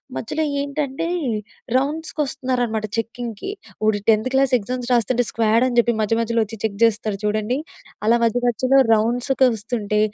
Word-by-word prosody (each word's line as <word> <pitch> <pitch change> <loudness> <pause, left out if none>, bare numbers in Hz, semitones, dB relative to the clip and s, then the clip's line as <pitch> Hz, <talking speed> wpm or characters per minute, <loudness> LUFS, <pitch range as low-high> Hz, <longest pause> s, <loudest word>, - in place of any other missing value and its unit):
మధ్యలో 310 +7 -2 0.2
ఏంటంటే 280 +1 -3 0.7
రౌండ్స్‌కొస్తున్నారనమాట 260 -5 -1
చెక్కింగ్‌కి 230 - -4 0.3
ఓడు 215 -1 +2
10త్ 220 +2 +4
క్లాస్ 270 -1 +3
ఎగ్జామ్స్ 245 +3 -4
రాస్తుంటే 245 +1 +2
స్క్వాడ్ 225 +1 +2
అని 245 - -2
చెప్పి 235 0 +4
మధ్య 215 +1 +1
మధ్యలో 230 0 +1
వచ్చి 225 +2 -8
చెక్ 215 -2 -1
చేస్తారు 215 -2 +1
చూడండి. 215 +4 0 0.5
అలా 230 +2 +5
మధ్య 230 +1 +2
మధ్యలో 255 +3 +2 0.2
రౌండ్స్‌కి 245 +5 +2
వొస్తుంటే 210 -1 -2
235 Hz, 135 wpm, -21 LUFS, 220-255 Hz, 0.7 s, అలా